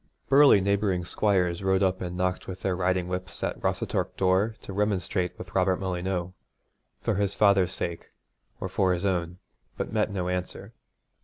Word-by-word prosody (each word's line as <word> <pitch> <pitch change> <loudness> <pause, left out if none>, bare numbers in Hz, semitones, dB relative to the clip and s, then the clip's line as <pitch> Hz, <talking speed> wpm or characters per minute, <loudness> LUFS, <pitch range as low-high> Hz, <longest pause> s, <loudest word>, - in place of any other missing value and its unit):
Burly 140 -7 +7
neighbouring 100 -2 +1
squires 90 -3 +1
rode 95 0 +2
up 95 -1 +1
and 90 0 -4
knocked 90 0 -1
with 95 0 -7
their 95 -2 +1
riding 90 0 0
whips 90 -1 -5
at - - -2
Rossatorc - - -1
door 95 +4 +2
to 100 - -7
remonstrate 100 -2 -1
with - - -10
Robert 95 0 +3
Molyneux, 90 -1 -2 0.7
for - - +1
his 100 0 0
father's 100 -4 +4
sake 85 -1 -5 0.5
or - - -3
for 95 0 +1
his 90 +2 -2
own, 90 -2 -1 0.4
but - - -4
met 110 -1 +1
no 95 -3 -3
answer. 90 0 -4
95 Hz, 165 wpm, -27 LUFS, 90-100 Hz, 0.7 s, Burly